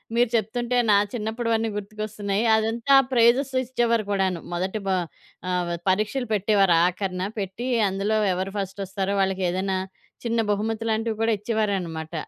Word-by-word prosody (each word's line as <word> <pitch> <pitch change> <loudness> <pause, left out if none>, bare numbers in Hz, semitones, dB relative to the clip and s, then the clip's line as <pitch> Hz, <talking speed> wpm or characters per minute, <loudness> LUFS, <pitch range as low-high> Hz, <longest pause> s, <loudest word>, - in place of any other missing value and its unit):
మీరు 240 -1 +3
చెప్తుంటే 240 +3 0
నా 205 - +6 0.2
చిన్నప్పుడువన్నీ 225 0 -1
గుర్తుకొస్తున్నాయి. 210 0 -3
అదంతా 225 +5 +2 0.2
ప్రైజెస్ 250 +3 +3
ఇచ్చేవారు 235 -3 +1
కూడాను. 190 -3 0
మొదటి 190 +4 -2
బా 190 - +2 0.6
ఆహ్, 180 -1 -1 0.2
పరీక్షలు 215 +7 0
పెట్టేవారు 200 -3 +3
ఆఖరిన 185 0 -2 0.2
పెట్టి 200 +6 -4 0.2
అందులో 200 +3 0 0.2
ఎవరు 190 +2 -3
ఫస్టొస్తారో 195 0 -3
వాళ్ళకి 190 -1 0
ఏదైనా 190 +1 -1 0.5
చిన్న 230 0 0
బహుమతి 220 +2 -1
లాంటివి 220 0 -1
కూడా 225 - +3
ఇచ్చేవారన్నమాట. 195 -7 -2
210 Hz, 125 wpm, -24 LUFS, 190-230 Hz, 0.6 s, నా